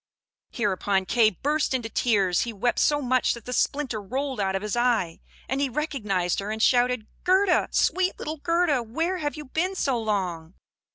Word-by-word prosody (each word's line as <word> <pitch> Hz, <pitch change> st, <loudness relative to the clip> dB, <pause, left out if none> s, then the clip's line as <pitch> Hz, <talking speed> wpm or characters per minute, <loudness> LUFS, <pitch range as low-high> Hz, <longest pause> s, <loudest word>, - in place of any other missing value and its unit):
Hereupon 195 Hz, -3 st, 0 dB
Kay 220 Hz, +3 st, +4 dB
burst 285 Hz, -, -1 dB
into 240 Hz, -3 st, -2 dB
tears; 200 Hz, -6 st, +1 dB
he 235 Hz, -, -2 dB
wept 225 Hz, +3 st, -1 dB
so 290 Hz, -1 st, +2 dB
much 255 Hz, 0 st, +2 dB
that 235 Hz, -, -12 dB
the 250 Hz, -, -4 dB
splinter 260 Hz, -5 st, 0 dB
rolled 260 Hz, +5 st, -3 dB
out 190 Hz, -1 st, 0 dB
of 195 Hz, -, -2 dB
his 210 Hz, +1 st, -2 dB
eye, 235 Hz, -9 st, +1 dB, 0.3 s
and 265 Hz, +1 st, -1 dB
he 280 Hz, -, +1 dB
recognised 210 Hz, -, -1 dB
her, 200 Hz, +1 st, -4 dB
and 220 Hz, +1 st, -3 dB
shouted, 245 Hz, -1 st, +3 dB, 0.2 s
"Gerda, 375 Hz, 0 st, +3 dB
sweet 375 Hz, 0 st, +1 dB
little 310 Hz, +1 st, -5 dB
Gerda! 335 Hz, -3 st, +1 dB
Where 325 Hz, +11 st, -2 dB
have 295 Hz, -1 st, -2 dB
you 300 Hz, -, -7 dB
been 350 Hz, +8 st, -1 dB
so 270 Hz, -9 st, 0 dB
long? 185 Hz, -6 st, -3 dB
245 Hz, 180 wpm, -25 LUFS, 205-290 Hz, 0.3 s, Kay